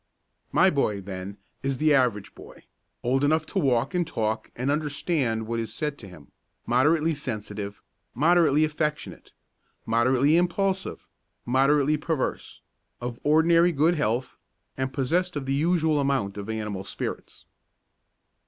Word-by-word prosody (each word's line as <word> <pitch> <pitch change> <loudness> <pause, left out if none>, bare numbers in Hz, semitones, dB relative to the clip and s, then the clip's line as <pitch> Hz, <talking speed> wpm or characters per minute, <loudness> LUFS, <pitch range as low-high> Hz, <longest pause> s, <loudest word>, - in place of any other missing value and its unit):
My 185 +5 +4
boy, 110 - 0
then, 95 +1 -7 0.2
is 135 -1 -1
the 155 +1 +3
average 120 -7 +1
boy, - - -14 0.4
old 130 +3 +1
enough 155 +2 +2
to - - -2
walk 125 +3 +1
and 175 -2 0
talk 110 -7 -2
and 130 +3 -1
understand 145 -6 -1
what 115 +1 -2
is 115 - -4
said 150 -2 -3
to 100 - -10
him, 85 -6 -15 0.3
moderately 155 +6 +2
sensitive, 105 -7 -5 0.3
moderately 155 +1 +4
affectionate, 150 0 -4 0.5
moderately 130 +7 +3
impulsive, 190 +2 -1 0.4
moderately 140 +4 +3
perverse, 150 -2 -3 0.4
of 120 -1 -5
ordinarily 165 +3 +4
good 155 +4 +3
health, 125 -4 -1 0.4
and 130 0 -2
possessed 170 +7 0
of 145 -2 -3
the 135 - -1
usual 160 0 +2
amount 135 -8 0
of 100 +1 -7
animal 105 -3 -4
spirits. 95 - -6
140 Hz, 135 wpm, -26 LUFS, 115-155 Hz, 0.5 s, My